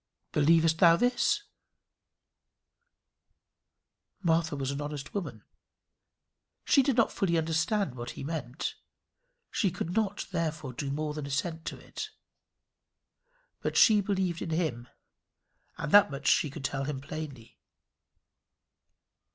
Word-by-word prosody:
"Believest 160 +1 +4
thou 170 -2 +7
this?" 245 - +2 2.8
Martha 165 -2 +2
was 135 -1 -2
an 140 +1 -4
honest 145 -1 -6
woman. 200 -4 -4 1.2
She 280 - +5
did 270 -1 +1
not 230 - +4
fully 170 -4 +1
understand 165 - 0
what 120 -1 -6
he - - -5
meant. 145 -3 -4 0.8
She 195 - +1
could 175 -1 -4
not, 210 -1 0
therefore, 155 -6 -2
do 135 +3 -4
more 150 +2 -2
than 150 -2 -5
assent 160 +4 -2
to - - -4
it. - - -7 1.5
But - - -1
she 215 -3 +7
believed 190 -4 -1
in - - -3
him, 155 -8 -1 0.9
and 150 - -4
that 205 -4 +8
much 140 -1 -5
she 150 - +4
could 135 0 -7
tell 135 0 -1
him 145 -2 -3
plainly. 140 -4 -8
160 Hz, 120 wpm, -29 LUFS, 140-180 Hz, 2.8 s, that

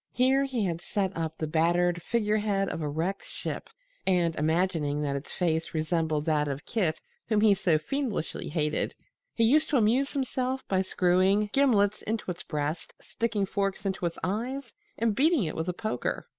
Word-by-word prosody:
Here 265 +2 +3
he 250 -6 -1
had 170 -2 -2
set 195 0 -1
up 160 -1 -3
the 155 - -2
battered 175 +2 +2
figurehead 210 -2 +1
of - - -4
a 150 - -1
wrecked 165 +7 -2
ship - - -5 0.4
and, 175 -3 +2
imagining 155 -2 +1
that 140 -1 -1
its 140 +2 -5
face 165 -2 -1
resembled 155 -1 0
that 150 -2 +2
of 140 0 -4
Kit 175 -9 0 0.3
whom 215 -2 +2
he 215 -2 +6
so 180 -5 +2
fiendishly 225 - -3
hated, 150 -1 -1 0.4
he 230 - +2
used 290 +7 +4
to 285 - +3
amuse 245 +5 +2
himself 260 -1 -2
by 190 -1 +2
screwing 190 +3 +2
gimlets 215 -7 +3
into 215 -3 -2
its 175 - -7
breast, 150 +1 -3
sticking 225 -3 -1
forks 195 0 -2
into 190 -2 -1
its 170 - -6
eyes 235 +6 -3 0.2
and 225 -1 +1
beating 305 - +3
it 155 - -3
with 160 +2 -2
a - - +2
poker. 215 +5 -3
190 Hz, 175 wpm, -28 LUFS, 160-225 Hz, 0.4 s, he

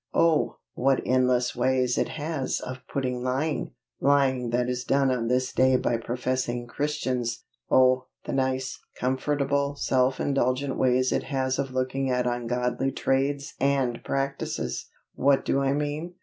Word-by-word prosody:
_ - - +3
Oh! 165 -2 +3 0.2
what 135 +1 +2
endless 125 -1 +2
ways 125 0 +2
it - - 0
has 155 -3 -2
of 130 0 -6
putting 125 -2 -1
lying! 135 +5 -1 0.2
lying 135 -3 +2
that 120 +1 +1
is 125 0 -2
done 135 +1 +2
on 120 -2 -1
this 125 +1 0
day 130 0 +4
by 120 -2 +1
professing 125 +1 -2
Christians! 130 -3 -2 0.3
Oh, 130 0 +4 0.2
the - - -3
nice, 130 0 -1 0.2
comfortable, 140 +2 0
self 130 -1 +1
indulgent 135 0 0
ways 130 0 +2
it - - 0
has 130 -1 -1
of 135 -1 -1
looking 130 +1 0
at 125 -1 +1
ungodly 125 +2 -1
trades 140 +2 0
and 135 -4 +1
practices! 135 - -3 0.2
What 140 0 +2
do 140 - +1
I 135 0 +2
mean? 150 +4 -3
130 Hz, 150 wpm, -26 LUFS, 125-140 Hz, 0.3 s, day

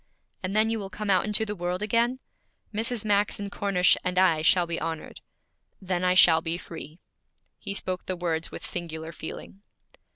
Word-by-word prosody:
'And 190 +1 -3
then 220 +1 +3
you 225 - -1
will 195 -2 -6
come 200 +2 -2
out 185 - +4
into 215 +1 +2
the 210 -1 -4
world 180 +2 -2
again? 235 +4 +2 0.6
Mrs. 225 +1 0
Max 205 -1 +2
and 200 0 -5
Cornish 195 -3 +3
and 180 0 -2
I 175 -4 +4
shall 175 +2 +4
be 170 -1 -3
honored.' 160 0 -5 0.6
'Then 185 -2 -2
I 180 0 +3
shall 165 -3 +7
be 165 +1 -2
free.' 165 -2 -9 0.6
He 200 -1 -5
spoke 185 -2 -3
the 185 - -1
words 165 -2 -2
with - - -7
singular 160 -2 -5
feeling. 170 +4 -9
185 Hz, 185 wpm, -27 LUFS, 170-205 Hz, 0.6 s, shall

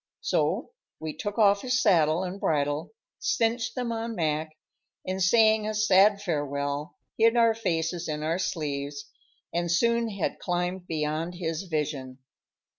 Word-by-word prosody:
So - - 0 0.3
we 155 -1 -5
took 205 0 -4
off 200 -2 +4
his 255 0 +1
saddle 170 -6 +3
and 185 +2 -5
bridle, 145 0 0 0.3
cinched 230 -1 0
them 245 -2 -2
on 230 0 -3
Mac, 155 -2 -1 0.5
and, 185 +1 -3
saying 220 +2 +4
a 215 - -2
sad 205 -1 +4
farewell, 145 -3 -2 0.2
hid 230 +1 +5
our 230 -1 +5
faces 170 -5 -2
in 150 0 -3
our 165 +3 0
sleeves, 145 -5 -3 0.5
and 170 0 0
soon 235 +6 +2
had 200 -5 -3
climbed 180 +1 -2
beyond 160 +2 -2
his 165 0 -3
vision. 145 -5 -3
175 Hz, 140 wpm, -27 LUFS, 155-215 Hz, 0.5 s, hid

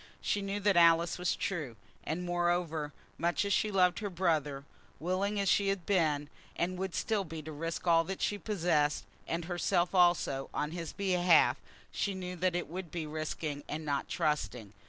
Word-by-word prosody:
She 205 - 0
knew 200 +1 -2
that 200 -1 +3
Alice 170 0 +5
was 180 - +1
true. 150 -11 -3 0.3
And, 165 +3 -3
moreover, 175 -3 0 0.3
much 175 +4 +1
as 200 - +1
she 215 - +2
loved 185 -3 +3
her 210 -2 -3
brother, 155 -6 0 0.4
willing 190 +5 0
as 200 - 0
she 200 +1 +3
had 195 -3 -1
been 155 -7 +1 0.3
and 180 +1 -1
would 190 -2 -3
still 215 -3 0
be 160 -3 -7
to 155 - -7
risk 165 +4 -4
all 165 -1 +5
that 190 +2 -4
she 205 - 0
possessed, 170 -8 +1 0.2
and 165 0 -2
herself 175 0 0
also, 175 -7 +3
on 150 +1 -1
his 165 -2 -5
behalf, 180 -3 +4 0.3
she 200 -1 -1
knew 180 -1 -5
that 180 0 +1
it 175 - -2
would 180 +1 -6
be 165 0 -4
risking 150 -1 -4
and 155 +1 -4
not 140 -2 -1
trusting. 125 -8 -1
175 Hz, 180 wpm, -32 LUFS, 155-185 Hz, 0.4 s, Alice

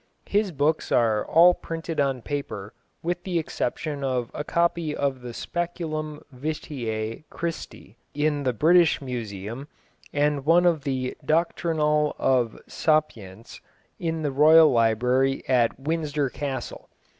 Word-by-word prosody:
His 205 -1 +1
books 155 +1 0
are 110 -3 +3
all 175 +2 +6
printed 165 -1 -5
on 135 -4 0
paper, 125 -8 -5 0.3
with 175 +1 -2
the 180 -2 -1
exception 150 -2 -3
of 125 -3 -1
a 145 - -4
copy 170 -1 0
of 135 -2 -1
the 125 -1 -7
Speculum 155 0 -4
Vitæ 125 -5 -4
Christi 165 - -6 0.2
in 150 0 +1
the 130 -2 +1
British 165 +7 +4
Museum, 115 -1 -6 0.4
and 145 -1 +1
one 170 +4 +4
of 165 -5 +2
the 130 -2 -2
Doctrinal 155 -2 +1
of 125 -4 +1
Sapyence, 115 - -2 0.4
in 165 -1 -2
the 145 - 0
Royal 155 +2 +7
Library 125 +3 +2
at 125 -2 +2
Windsor 150 -2 -1
Castle. 135 -3 -5
145 Hz, 125 wpm, -25 LUFS, 125-160 Hz, 0.4 s, Royal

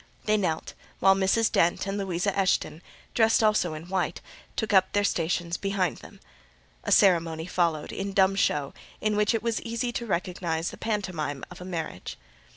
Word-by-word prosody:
They 215 - +3
knelt; 175 -6 -1 0.3
while 195 - +6
Mrs. 195 +4 +2
Dent 170 +2 +2
and 195 0 -3
Louisa 195 -1 -1
Eshton, 185 -4 0 0.3
dressed 225 -1 +4
also 210 -7 +2
in 160 +2 -9
white, 185 -1 -1 0.4
took 220 -2 -1
up 190 -1 +4
their 205 - +2
stations 170 -2 0
behind 195 -4 -1
them. - - -14 0.6
A - - -3
ceremony 165 -4 +4
followed, 170 -4 0
in 195 +1 -4
dumb 190 0 +4
show, 145 -7 0 0.3
in 215 -1 0
which 210 +2 +2
it 225 - -2
was 230 -1 -1
easy 235 +1 -2
to 235 0 -4
recognise 170 -3 -2
the - - -9
pantomime 180 - -3
of 180 - -11
a - - -7
marriage. 165 - -5
190 Hz, 170 wpm, -27 LUFS, 170-205 Hz, 0.6 s, while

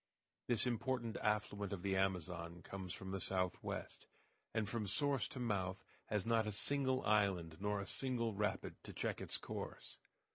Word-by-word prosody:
This 120 -1 +3
important 120 -1 0
affluent 105 -1 0
of 95 -2 -4
the 95 -1 +2
Amazon 90 -2 -1
comes 95 -2 -5
from 95 +2 -5
the 95 - -1
southwest, 90 -1 0 0.4
and 110 -2 +1
from 105 0 -1
source 140 +6 +2
to 130 - -7
mouth 95 -5 0 0.2
has 105 -3 0
not 115 -1 +3
a - - 0
single 130 +4 +1
island, 95 -7 +3
nor 105 0 +1
a 100 - -3
single 120 -3 0
rapid, 105 0 -1
to - - -8
check - - -1
its - - +1
course. - - -6
105 Hz, 160 wpm, -40 LUFS, 95-115 Hz, 0.4 s, This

